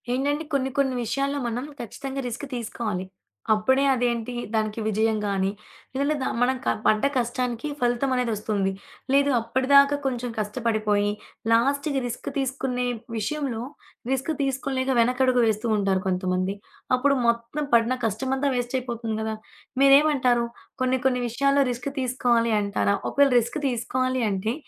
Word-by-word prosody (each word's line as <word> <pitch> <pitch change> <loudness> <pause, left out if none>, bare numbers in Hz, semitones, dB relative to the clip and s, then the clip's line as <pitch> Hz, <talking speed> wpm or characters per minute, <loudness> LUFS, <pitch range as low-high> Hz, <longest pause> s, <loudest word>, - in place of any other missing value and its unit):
ఏంటండి, 285 +4 0
కొన్ని 265 -1 +1
కొన్ని 270 -2 +2
విషయాల్లో 275 +5 -1
మనం 240 +3 -3
ఖచ్చితంగా 270 +3 -5
రిస్క్ 245 +4 -5
తీసుకోవాలి. 215 -5 -3 0.5
అప్పుడే 260 +6 +2
అదేంటి, 240 -1 -1 0.2
దానికి 215 0 -1
విజయం 220 +1 +1
గానీ, 195 -1 0 0.5
లేదంటే 285 +3 +1
ద - - -1 0.2
మనం 255 +2 +3
క - - -3 0.2
పడ్డ 215 0 +3
కష్టానికి 245 +1 -1
ఫలితమనేదొస్తుంది, 235 -5 0 0.4
లేదు 280 +1 +4
అప్పడి 235 +3 -2
దాకా 280 +1 +7
కొంచెం 250 -2 -1
కష్టపడిపోయి, 210 -2 0 0.4
లాస్ట్‌కి 275 +4 +2
రిస్క్ 235 - -5
తీసుకునే 265 -2 -1 0.3
విషయంలో 250 +1 -2 0.5
రిస్క్ 265 +4 0
తీసుకోలేక 270 -1 -1
వెనకడుగు 250 +1 +3
వేస్తూ 220 +1 0
ఉంటారు 195 -2 +1
కొంతమంది. 185 +1 0 0.4
అప్పుడు 275 +2 +2
మొత్తం 235 +5 0
పడిన 235 +2 +4
కష్టమంతా 265 +6 0
వేస్టయిపోతుంది 240 -2 -2
గదా. 220 0 -2 0.5
మీరేమంటారు, 275 -4 +5 0.4
కొన్ని 255 0 +2
కొన్ని 250 -1 +2
విషయాల్లో 275 +4 +2
రిస్క్ 245 +3 -4
తీసుకోవాలి 240 -3 +1
అంటారా? 200 0 +1
ఒకవేళ 280 -1 +4
రిస్క్ 240 +5 -3
తీసుకోవాలి 255 +1 -1
అంటే 200 +3 -1
245 Hz, 125 wpm, -25 LUFS, 225-270 Hz, 0.5 s, దాకా